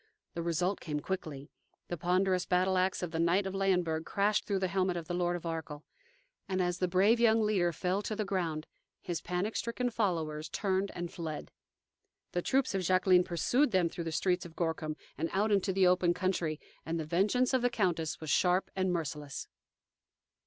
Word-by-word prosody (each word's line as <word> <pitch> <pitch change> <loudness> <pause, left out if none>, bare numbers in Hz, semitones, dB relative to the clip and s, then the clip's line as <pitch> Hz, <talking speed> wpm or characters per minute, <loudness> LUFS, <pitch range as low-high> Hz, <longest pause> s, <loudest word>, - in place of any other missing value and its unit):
The 170 - -3
result 170 +3 0
came 150 -2 -3
quickly. 150 -5 -5 0.4
The 175 - -2
ponderous 180 +2 +1
battle 185 +1 +2
axe 185 0 +1
of 175 - -3
the 165 - -2
knight 175 +4 +3
of 190 - -3
Leyenburg 180 -5 +1
crashed 205 +4 +1
through 200 - +1
the 190 0 0
helmet 185 -1 0
of 165 -2 -6
the - - -3
Lord 175 0 +1
of 175 - -6
Arkell, 160 -2 -5 0.6
and 190 -1 0
as 180 -1 0
the 185 - +1
brave 195 +6 +4
young 225 -1 +5
leader 190 -5 +2
fell 185 +4 -1
to 215 - -3
the 215 0 -2
ground, 170 -6 -2 0.3
his 175 -3 -4
panic 180 +5 -2
stricken 245 +1 -1
followers 165 -8 -1
turned 195 -1 0
and 175 -1 -5
fled. 160 -3 -5 0.8
The 175 - -1
troops 260 +5 +1
of 195 - 0
Jacqueline 185 0 +4
pursued 190 - +2
them 185 -5 +2
through 170 0 -6
the 165 - -2
streets 180 +2 +1
of 165 -2 -11
Gorkum 160 -2 -2 0.2
and 165 - 0
out 210 +3 +2
into 195 -1 +2
the 190 0 +3
open 180 -1 +3
country, 175 -5 -1 0.2
and 165 +1 -2
the 160 - -3
vengeance 205 - +2
of 260 - +3
the 245 - +3
countess 175 -9 -1
was 155 -2 -4
sharp 180 +1 +2
and 190 -1 +1
merciless. 150 -4 -4
180 Hz, 195 wpm, -31 LUFS, 165-195 Hz, 0.8 s, young